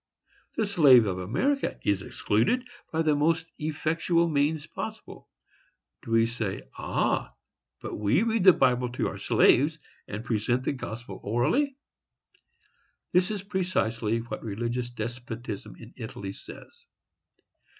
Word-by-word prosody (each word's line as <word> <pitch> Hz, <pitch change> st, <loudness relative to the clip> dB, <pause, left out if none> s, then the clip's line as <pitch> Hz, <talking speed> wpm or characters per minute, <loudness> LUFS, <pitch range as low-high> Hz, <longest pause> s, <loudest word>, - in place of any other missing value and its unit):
—The 220 Hz, -, +1 dB
slave 145 Hz, -, +6 dB
of 95 Hz, -2 st, -2 dB
America 210 Hz, -, 0 dB
is 100 Hz, -2 st, +1 dB
excluded 120 Hz, -, 0 dB, 0.2 s
by 160 Hz, 0 st, +1 dB
the 155 Hz, -2 st, +3 dB
most 160 Hz, +2 st, +2 dB
effectual 160 Hz, +3 st, +1 dB
means 150 Hz, 0 st, +1 dB
possible. -, -, -8 dB, 0.7 s
Do -, -, -11 dB
we 115 Hz, 0 st, +4 dB
say, 115 Hz, -4 st, -3 dB, 0.2 s
"Ah! -, -, 0 dB, 0.5 s
but -, -, -5 dB
we 105 Hz, -, +3 dB
read 225 Hz, -3 st, +1 dB
the 185 Hz, -, +10 dB
Bible 125 Hz, -3 st, +2 dB
to -, -, 0 dB
our -, -, -8 dB
slaves, 150 Hz, +6 st, +4 dB, 0.3 s
and 105 Hz, +3 st, -6 dB
present 120 Hz, +2 st, 0 dB
the -, -, 0 dB
gospel 120 Hz, -3 st, -7 dB
orally?"—This 180 Hz, -, -3 dB
is 205 Hz, -3 st, -3 dB
precisely 120 Hz, -, 0 dB
what 120 Hz, -, -6 dB
religious 120 Hz, +3 st, -3 dB
despotism 115 Hz, -, -6 dB
in -, -, -13 dB
Italy 95 Hz, -1 st, -6 dB
says. -, -, -12 dB
125 Hz, 125 wpm, -27 LUFS, 115-165 Hz, 0.7 s, the